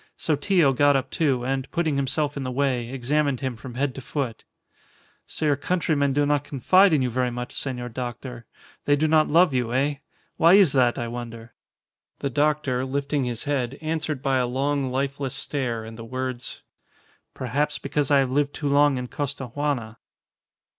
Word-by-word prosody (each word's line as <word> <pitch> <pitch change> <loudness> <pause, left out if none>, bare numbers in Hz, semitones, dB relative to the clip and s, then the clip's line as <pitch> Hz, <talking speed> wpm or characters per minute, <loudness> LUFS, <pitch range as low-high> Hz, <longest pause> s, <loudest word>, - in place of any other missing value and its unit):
Sotillo 155 -1 +2
got 145 +2 +4
up, 135 0 -1
too, 135 -6 +1
and, 135 0 -2
putting 165 -4 0
himself 145 +2 0
in 140 - -4
the 130 - -3
way, 125 -2 0
examined 135 +1 0
him 130 -3 -2
from 120 +2 -10
head 135 +1 0
to 135 - -8
foot. 130 -3 -4 0.8
"So 155 - -4
your 145 -2 +3
countrymen 145 -2 0
do 145 +2 +2
not 145 -1 +1
confide 180 +8 +4
in 150 -4 +3
you 125 - -1
very 125 +1 0
much, 125 0 -6
senor 125 -3 -3
doctor. 120 0 -6 0.4
They 145 - +4
do 155 +2 +1
not 155 0 +4
love 170 -1 +4
you, 120 -2 0
eh? 140 +2 +1 0.4
Why 170 +3 +6
is 195 -7 +6
that, 125 -3 +3
I 120 - -2
wonder?" 115 -1 -7 0.6
The 140 - -3
doctor, 145 -2 +1
lifting 140 +1 -1
his 120 -2 -3
head, 135 -2 -2
answered 155 -3 -3
by 135 -1 +2
a 125 -1 +1
long, 140 +2 0
lifeless 135 0 -2
stare 120 -6 -2
and 110 +1 -10
the - - -6
words, 130 0 -5 0.7
"Perhaps 145 +4 -1
because 145 -1 -2
I 145 - +5
have 135 -2 +2
lived 145 +1 0
too 145 -2 -2
long 145 -1 +4
in 125 0 -4
Costaguana." 130 -3 -3
135 Hz, 180 wpm, -24 LUFS, 125-145 Hz, 0.8 s, Why